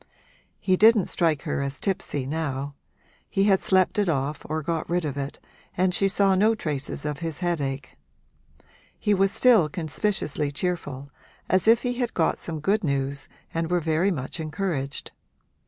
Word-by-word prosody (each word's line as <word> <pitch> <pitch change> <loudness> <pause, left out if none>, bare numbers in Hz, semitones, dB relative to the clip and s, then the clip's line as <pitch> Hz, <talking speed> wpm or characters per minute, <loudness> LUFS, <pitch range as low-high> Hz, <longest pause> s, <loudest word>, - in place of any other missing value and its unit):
He 185 -2 +2
didn't 220 -1 +6
strike 160 -5 +1
her - - -2
as 140 0 -3
tipsy 160 -8 -2
now; 140 -1 -3 0.6
he 195 - +1
had 195 -2 +4
slept 190 +2 +3
it 200 -3 +2
off 145 0 -1
or 155 0 -2
got 165 +1 -2
rid 175 -1 0
of 145 - -3
it 140 0 -4 0.4
and 185 0 +2
she 195 - +3
saw 195 0 +3
no 215 +4 +4
traces 145 -6 -3
of 150 -1 -3
his 165 -3 -4
headache. 140 -6 -2 1.0
He 210 - +1
was 195 0 +3
still 220 -12 +5
conspicuously 155 -2 -1
cheerful, 145 -4 -3 0.4
as 185 +2 +2
if 230 +1 +5
he 245 0 -2
had 245 -2 -1
got 165 - +1
some 160 -3 -4
good 200 +6 +1
news 140 -2 -2 0.2
and 165 0 -1
were 180 0 +2
very 165 +4 +1
much 150 -2 -4
encouraged. 155 -3 -3
165 Hz, 165 wpm, -25 LUFS, 145-195 Hz, 1.0 s, didn't